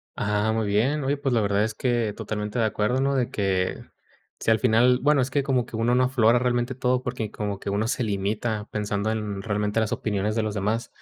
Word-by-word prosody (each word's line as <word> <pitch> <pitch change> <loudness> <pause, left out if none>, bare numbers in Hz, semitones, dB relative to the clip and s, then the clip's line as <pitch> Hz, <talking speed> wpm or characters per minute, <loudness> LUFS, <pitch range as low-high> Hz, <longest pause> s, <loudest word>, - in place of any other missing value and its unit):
Ah, 105 +1 0
muy 110 -1 0
bien. 125 +9 +1
Oye, 140 +2 0
pues, 140 -2 -1
la 115 - +3
verdad, 100 0 +1
es 110 0 -2
que, 120 -3 0
totalmente 105 +2 -4
de 115 - +3
acuerdo, 110 +4 0
¿no? 140 0 +1
De 125 -3 0
que, 95 -2 0 0.6
si - - -1
al 110 -1 +4
final 125 +1 +4
Bueno, 145 0 +4
es 130 - -1
que, 140 +1 0
como 130 -3 +1
que 115 - -9
uno 115 +2 +1
no 130 - +4
aflora 120 -2 +3
realmente, 120 0 0
todo, 125 0 0
porque 120 -4 -3
como 100 -2 -4
que - - -5
uno 100 +3 0
se 125 +1 -1
limita, 105 +1 -2
pensando 105 0 -1
en 105 -3 -3
realmente, 105 0 0
las 110 -1 0
opiniones 105 0 -1
de 115 - +1
los 110 -1 -3
demás. 105 +4 -1
110 Hz, 230 wpm, -25 LUFS, 105-125 Hz, 0.6 s, al